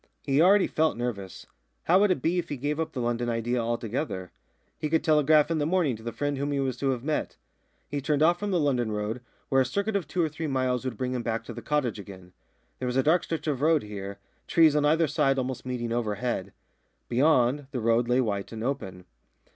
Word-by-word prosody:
He 140 +1 +2
already 195 +3 +6
felt 155 -4 +1
nervous. 105 -6 -5 0.4
How 180 +3 +4
would 205 0 +4
it 185 - 0
be 175 +2 +2
if 170 - -5
he 145 - -3
gave 145 +4 -2
up 160 - -2
the 130 - -4
London 120 0 -1
idea 120 +1 -1
altogether? 115 - -3 0.5
He 150 - -2
could 160 0 +2
telegraph 155 -1 +4
in 160 - +1
the 145 - +1
morning 165 -7 +1
to 110 - -12
the 115 +1 -4
friend 145 +4 -2
whom 145 +1 -1
he 140 - 0
was 135 -2 -1
to 135 +2 0
have 125 -2 -1
met. 155 +1 -2 0.5
He 145 -1 -3
turned 150 +1 +1
off 175 +2 +4
from 205 - -2
the 180 -3 +1
London 125 -7 +1
road, 105 +3 -3 0.3
where 135 0 +4
a - - +4
circuit 200 +11 -2
of 195 -5 -1
two 185 - -4
or - - +2
three 155 +1 -5
miles 130 -2 0
would 125 -4 -3
bring 130 +2 -2
him 125 - -2
back 115 -1 -2
to - - -8
his - - -8
cottage 140 -7 -1
again. 95 -2 -11 0.5
There 130 - -2
was 125 +1 -1
a 135 - +3
dark 165 +3 +3
stretch 160 -2 -4
of 145 -4 -1
road 155 0 +3
here, 100 -1 -7 0.3
trees 160 -3 +5
on 150 -1 +3
either 160 +2 +4
side 135 -1 +1
almost 130 -1 -3
meeting 120 -2 -3
overhead. 110 -3 -2 0.6
Beyond, 130 +1 +2
the 130 - -4
road 115 +1 +2
lay 125 +1 +3
white 100 -4 -2
and 110 -1 -6
open. 95 -9 -4
130 Hz, 235 wpm, -27 LUFS, 115-155 Hz, 0.6 s, already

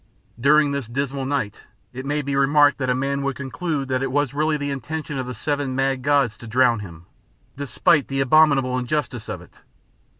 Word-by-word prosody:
During 145 +3 +4
this 140 -4 -3
dismal 135 +2 -3
night, 135 -8 -2 0.3
it 130 +2 -6
may 145 +1 -1
be 140 0 -2
remarked 145 +1 +4
that 130 -2 -1
a 125 - +2
man 140 +2 -1
would 140 -1 -2
conclude 140 +1 -3
that 130 0 0
it 135 -1 -2
was 145 -1 0
really 155 +1 +1
the 145 -1 -3
intention 145 +2 -4
of 130 - -4
the 125 - -5
seven 145 -3 -2
mad 135 -1 0
gods 135 -5 +1
to 120 - -10
drown 120 0 +3
him, 85 -4 -10 0.5
despite 140 +3 +2
the 135 0 -2
abominable 135 -2 +4
injustice 125 -4 -3
of - - -5
it. - - -18
135 Hz, 195 wpm, -22 LUFS, 130-145 Hz, 0.5 s, During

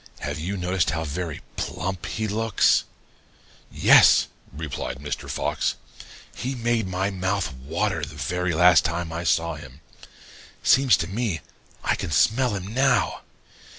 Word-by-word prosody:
Have - - -4
you 95 +6 -3
noticed 90 -1 0
how 80 +1 -2
very 80 +1 -4 0.2
plump 95 +1 -4
he 110 -1 -2
looks?' 110 0 +2 0.9
"'Yes,' - - +6 0.2
replied 75 -5 -5
Mr. 75 +2 -5
Fox. - - -1 0.6
'He 130 +2 -3
made 115 -3 0
my 95 +2 -1
mouth 95 -5 -2
water 80 +7 -2
the 75 +1 -6
very 85 +5 -2
last 85 -1 +6
time 80 +2 -2
I 85 +1 -4
saw 85 0 +1
him. 65 -3 -11 0.8
Seems 130 -2 +5
to - - -9
me 100 - -2 0.4
I - - +2
can - - -4
smell 115 - +2
him 100 +2 -6
now. 125 - +2
90 Hz, 140 wpm, -24 LUFS, 80-105 Hz, 0.9 s, Yes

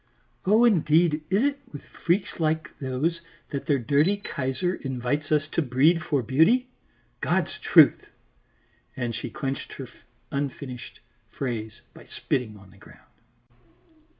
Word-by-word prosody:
"Oh 220 +4 +5
indeed, 165 -6 +3
is 195 +6 +2
it 280 0 0
with 145 - -9
freaks 180 +2 -2
like 160 -1 0
those 145 +6 -1 0.3
that 140 - -4
their 145 - +3
dirty 145 - +2
Kaiser 175 -2 -2
invites 135 +1 -3
us 155 0 +2
to 170 - 0
breed 150 +5 +3
for 140 -4 0
beauty? 200 - +3 0.5
God's - - 0
truth!" - - +5 0.9
and 120 -2 -2
she 120 - -5
clinched 135 +2 -4
her 135 - -7 0.4
unfinished 140 -3 -5 0.3
phrase 110 -5 -5
by - - -15
spitting 110 -5 -3
on 100 -1 -17
the 100 - -19
ground. - - -18
145 Hz, 130 wpm, -26 LUFS, 130-170 Hz, 0.9 s, Oh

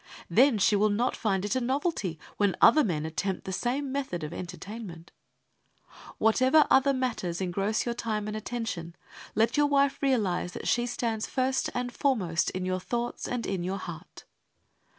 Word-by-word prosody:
Then 250 +5 +5
she 205 +1 +3
will 210 +1 +3
not 230 +5 0
find 195 -3 0
it 205 - -1
a 260 - +1
novelty 260 - -1 0.2
when 200 -2 +2
other 305 - +7
men 160 -7 -1
attempt 185 +4 -3
the 190 - -4
same 260 +7 -1
method 260 - -3
of 150 +2 -5
entertainment. 180 0 -8 1.1
Whatever 255 +7 +4
other 270 +1 +5
matters 240 -10 -2
engross 195 +4 -1
your 240 - -1
time 215 -3 -3
and 215 - -4
attention, 215 -7 -4 0.4
let 225 +6 +2
your 295 0 +4
wife 280 -1 +2
realize 205 -10 +1
that - - -6
she 240 0 +2
stands 230 -3 -2
first 260 0 0
and 245 0 -2
foremost 195 - +1
in 185 0 -4
your 185 0 -1
thoughts 240 +5 -3
and 245 -1 -2
in 190 -3 -2
your 190 +2 -2
heart. 175 -4 -9
220 Hz, 170 wpm, -28 LUFS, 185-255 Hz, 1.1 s, other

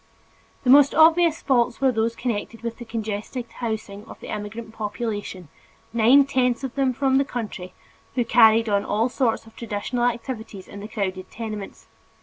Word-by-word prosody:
The 250 - +4
most 280 0 +7
obvious 330 +1 +5
faults 245 -3 +2
were 270 -1 +3
those 230 0 0
connected 230 -1 -4
with 230 0 -5
the 240 - -7
congested 220 +2 -4
housing 215 -4 -5
of - - -12
the - - -10
immigrant 220 +2 -6
population, 210 -4 -4 0.5
nine 240 +5 +6
tenths 255 -2 0
of 265 - -4
them 270 -2 +1
from 265 +1 +2
the - - +3
country, 210 -8 -6 0.4
who 245 -2 +1
carried 225 -1 +5
on 200 -1 +1
all 220 +5 0
sorts 245 -4 0
of 225 - -17
traditional 235 +2 -2
activities 230 -5 -4
in 200 - -10
the 205 - -7
crowded 190 -4 -4
tenements. 215 -3 -7
230 Hz, 165 wpm, -23 LUFS, 210-255 Hz, 0.5 s, most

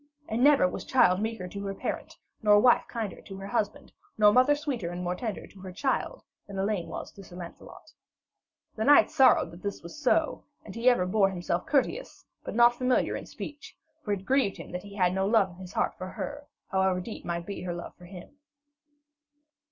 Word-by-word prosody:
And 230 +3 0
never 285 -9 +6
was - - -5
child 210 -8 +3
meeker 220 -4 -3
to 200 +2 -7
her 195 - -4
parent, - - -5 0.2
nor 210 -2 +6
wife 245 +2 +4
kinder 225 -4 -5
to 195 - -10
her 195 - -7
husband, 235 +6 -3 0.2
nor 210 -1 +6
mother 255 +5 +5
sweeter 270 - -3
and 175 +1 -5
more 180 0 -1
tender 215 +2 -5
to 195 - -17
her 190 -1 -7
child, 270 - -2 0.2
than 200 -1 -8
Elaine 195 -3 -1
was - - -6
to 200 - -13
Sir 180 - -13
Lancelot. 175 -1 -11 0.8
The 220 - -2
knight 290 +4 +6
sorrowed 265 - +5
that 170 +2 -12
this 200 -1 -5
was 170 - -9
so; 305 +3 +1 0.2
and 195 - -9
he 230 +4 +3
ever 240 -8 +2
bore 195 +1 +3
himself 175 -1 -3
courteous, 300 - -1 0.2
but - - -6
not 240 +1 +6
familiar 255 +1 +1
in - - -6
speech, 290 -1 -9 0.3
for 210 - -3
it 195 -1 -5
grieved 260 -6 +2
him - - -9
that 180 +1 -4
he 200 +1 -12
had 180 -3 +2
no 190 +1 0
love 205 -4 +3
in 175 - -15
his 185 0 -10
heart - - 0
for 185 - -5
her, 290 +9 -6 0.2
however 190 -1 +2
deep 215 +5 -7
might 170 0 -3
be 200 - -6
her 175 -2 -4
love 175 - -7
for 175 - -15
him. 180 +9 -12
200 Hz, 210 wpm, -28 LUFS, 185-245 Hz, 0.8 s, never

